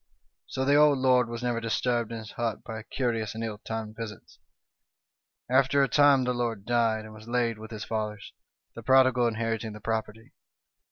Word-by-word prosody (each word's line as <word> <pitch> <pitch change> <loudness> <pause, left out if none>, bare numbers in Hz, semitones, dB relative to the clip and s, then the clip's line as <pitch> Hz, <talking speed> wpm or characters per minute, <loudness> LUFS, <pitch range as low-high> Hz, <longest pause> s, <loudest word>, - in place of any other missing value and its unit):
" - - -52
So 130 - -2
the 140 - +3
old 145 -1 +6
lord 125 -2 +3
was 120 +1 -5
never 120 -1 -1
disturbed 115 0 0
in 115 - -4
his 110 -1 -9
hut 115 -3 -3
by 110 -1 -6
curious 115 -2 -2
and 115 - -4
ill 110 -2 -4
timed 110 -1 -5
visits. 110 -3 -9 0.6
" - - -65 0.3
After 135 +2 +3
a - - +2
time 145 -1 +5
the 125 0 0
lord 115 -4 -3
died, 115 -2 +1
and 110 - -11
was 110 +1 -13
laid 120 -2 0
with 110 0 -9
his 110 -2 -6
fathers, 105 -2 -4 0.4
the 115 - -9
prodigal 130 0 +4
inheriting 115 -1 -2
the 105 - -9
property. 110 0 -4
115 Hz, 190 wpm, -27 LUFS, 110-125 Hz, 0.6 s, old